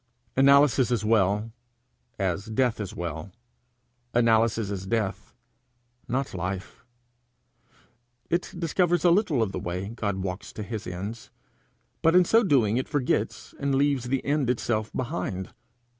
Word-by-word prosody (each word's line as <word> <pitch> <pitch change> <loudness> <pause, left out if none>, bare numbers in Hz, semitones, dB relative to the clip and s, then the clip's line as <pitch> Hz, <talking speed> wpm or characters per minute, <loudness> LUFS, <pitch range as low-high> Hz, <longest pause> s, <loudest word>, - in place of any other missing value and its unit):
Analysis 140 -1 +5
is 115 -4 0
well, 105 0 +2 0.7
as 95 +1 -1
death 120 +1 +1
is 105 -3 -5
well; 85 +2 -5 0.8
analysis 115 -2 +3
is 95 -1 -5
death, 105 -3 -2 0.7
not 130 +2 -2
life. 95 +1 -5 1.4
It 170 +2 -1
discovers 175 0 +1
a 175 - +7
little 170 - +3
of 100 - -2
the - - -4
way 90 +3 -4
God 105 -3 -2
walks 95 +1 -5
to 105 - -5
his 105 0 -5
ends, 100 +6 -6 0.7
but 165 +1 +4
in 180 -1 +7
so 225 +6 +5
doing 120 - +3
it 130 - -2
forgets 145 -5 -1
and 140 -1 0
leaves 140 -2 +2
the 130 +1 -1
end 140 -3 +1
itself 115 -3 -1
behind. 120 - -4
115 Hz, 135 wpm, -26 LUFS, 100-140 Hz, 1.4 s, a